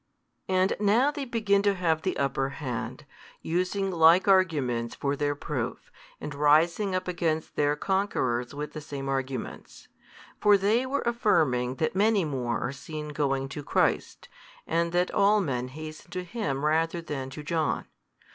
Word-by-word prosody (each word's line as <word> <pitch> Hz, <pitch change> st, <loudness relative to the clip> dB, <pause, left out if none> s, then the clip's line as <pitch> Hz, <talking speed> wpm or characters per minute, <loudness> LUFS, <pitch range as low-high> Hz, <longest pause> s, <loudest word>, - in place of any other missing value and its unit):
And 185 Hz, 0 st, +3 dB
now 225 Hz, +7 st, +3 dB
they 290 Hz, -2 st, -5 dB
begin 220 Hz, -5 st, +1 dB
to 200 Hz, -1 st, +2 dB
have 165 Hz, -4 st, +1 dB
the 185 Hz, -, -2 dB
upper 135 Hz, -1 st, 0 dB
hand, 130 Hz, -7 st, -5 dB, 0.4 s
using 185 Hz, +3 st, -1 dB
like 170 Hz, +2 st, +5 dB
arguments 145 Hz, -12 st, +2 dB
for 140 Hz, 0 st, -1 dB
their 145 Hz, 0 st, -1 dB
proof, 130 Hz, -4 st, -4 dB, 0.3 s
and 150 Hz, -, -6 dB
rising 165 Hz, +7 st, +3 dB
up 185 Hz, 0 st, -2 dB
against 165 Hz, -3 st, -1 dB
their 145 Hz, 0 st, +2 dB
conquerors 150 Hz, -9 st, -1 dB
with 150 Hz, +1 st, -5 dB
the 155 Hz, -, -6 dB
same 140 Hz, -2 st, -6 dB
arguments. 135 Hz, -2 st, -5 dB, 0.5 s
For 205 Hz, -1 st, +6 dB
they 220 Hz, +6 st, +1 dB
were 280 Hz, +2 st, -1 dB
affirming 145 Hz, -, +2 dB
that 160 Hz, +6 st, -1 dB
many 205 Hz, -2 st, +3 dB
more 125 Hz, -5 st, -2 dB
are 125 Hz, -, -2 dB
seen 150 Hz, +2 st, -7 dB
going 135 Hz, -2 st, -1 dB
to 145 Hz, -, -6 dB
Christ, 145 Hz, -, 0 dB, 0.4 s
and 170 Hz, 0 st, 0 dB
that 175 Hz, +1 st, +1 dB
all 205 Hz, +2 st, +4 dB
men 125 Hz, -9 st, -2 dB
hasten 155 Hz, +3 st, -9 dB
to 185 Hz, -2 st, -4 dB
Him 170 Hz, -, -3 dB
rather 165 Hz, +2 st, +1 dB
than 140 Hz, -5 st, -5 dB
to 150 Hz, +3 st, -8 dB
John. 160 Hz, 0 st, -1 dB
160 Hz, 155 wpm, -27 LUFS, 140-190 Hz, 0.5 s, For